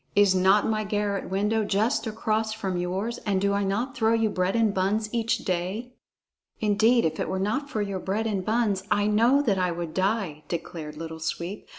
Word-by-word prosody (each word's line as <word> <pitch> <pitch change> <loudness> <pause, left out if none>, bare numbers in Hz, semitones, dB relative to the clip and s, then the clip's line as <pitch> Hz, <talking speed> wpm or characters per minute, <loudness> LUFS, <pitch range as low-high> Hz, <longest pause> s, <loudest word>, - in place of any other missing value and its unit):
"Is 200 -2 +5
not 190 +2 +4
my 215 -1 0
garret 205 -1 -2
window 210 +3 +1
just 215 +5 0
across 220 0 -1
from 195 -4 -3
yours, 185 +6 -2
and 200 -3 0
do 200 +1 +1
I 200 0 +1
not 230 +7 -1
throw 225 -2 +2
you 225 -2 +2
bread 185 +1 0
and 225 -3 +2
buns 210 +3 0
each 230 -1 0
day?" 190 +7 -2 0.7
"Indeed, 220 +3 +3
if 160 - -1
it - - -2
were 190 - -1
not 215 +9 -1
for 215 -7 -1
your 200 -2 -3
bread 200 +4 -2
and 200 -4 -1
buns, 215 -2 +1
I 205 - +2
know 230 +7 +4
that 200 -8 +1
I 180 -1 +1
would 170 -2 -4
die," 190 -6 -1
declared 160 -3 -5
Little 160 0 -6
Sweep. 170 +4 -4
205 Hz, 200 wpm, -26 LUFS, 185-220 Hz, 0.7 s, Is